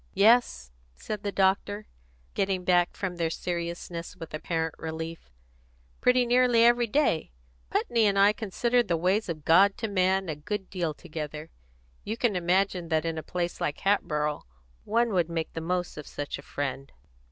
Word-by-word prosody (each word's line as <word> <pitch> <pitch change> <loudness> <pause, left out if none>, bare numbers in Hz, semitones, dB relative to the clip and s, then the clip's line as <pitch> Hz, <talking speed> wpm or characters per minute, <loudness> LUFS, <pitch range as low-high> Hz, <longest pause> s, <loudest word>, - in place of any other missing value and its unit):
"Yes," 200 - +4 0.2
said 205 - -5
the 205 - -2
doctor, 200 +2 +1 0.5
getting 190 -2 0
back 175 -1 +2
from 185 -3 -3
their 165 -1 0
seriousness, 170 0 -4
with 165 -4 -10
apparent 160 +1 -2
relief. 160 - -6 0.7
"Pretty 250 0 +4
nearly 245 -1 +4
every 240 0 +4
day. 210 - +1 0.4
Putney 230 -1 +2
and 200 -1 +1
I 200 +1 +6
consider 235 +3 +1
the 180 -8 0
ways 185 +5 +1
of 155 -3 -5
God 195 +5 +5
to 225 - -2
man 190 -1 +1
a 155 - -3
good 190 +6 -5
deal 170 -5 -2
together. 150 0 -7 0.5
You 220 +2 -4
can 235 -4 +1
imagine 180 0 +1
that 160 0 +1
in 165 -1 -2
a - - -5
place 175 +1 -3
like 150 - -2
Hatboro' 150 -7 0 0.4
one 230 0 +1
would 175 -3 +1
make 165 -1 -3
the 165 - -4
most 180 +1 -2
of 150 - -8
such 145 -1 -5
a - - -8
friend. 135 -1 -4
180 Hz, 165 wpm, -27 LUFS, 160-205 Hz, 0.7 s, I